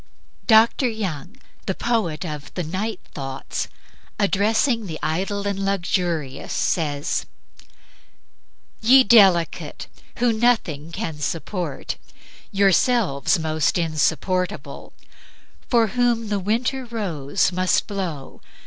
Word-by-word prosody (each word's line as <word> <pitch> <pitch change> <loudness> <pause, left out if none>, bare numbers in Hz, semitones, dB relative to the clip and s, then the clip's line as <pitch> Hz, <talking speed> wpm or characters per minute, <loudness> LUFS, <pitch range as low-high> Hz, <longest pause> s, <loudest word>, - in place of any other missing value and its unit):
'" - - -37
Dr. 230 +3 +5
Young, 195 - -5 0.3
the 190 - 0
poet 195 -9 -1
of 150 -3 -6
the 180 - -2
"Night 190 +6 -3
Thoughts," 135 -1 -4 0.5
addressing 215 +3 +2
the 160 -3 -5
idle 195 +5 -1
and 195 -1 -2
luxurious, 175 -7 -1
says: 145 -4 -1 1.5
"Ye 260 +4 +7
delicate! 195 -9 +4 0.3
who 240 -1 +2
nothing 210 -10 +1
can 160 -2 -4
support 165 0 -3 0.5
(Yourselves 195 - +3
most 160 -1 0
insupportable) 175 +3 -1 0.8
for 235 -2 +4
whom 240 -2 +1
The 205 -1 0
winter 235 +7 -1
rose 190 - -1
must 185 0 +1
blow 180 -9 -5
190 Hz, 100 wpm, -22 LUFS, 160-220 Hz, 1.5 s, Ye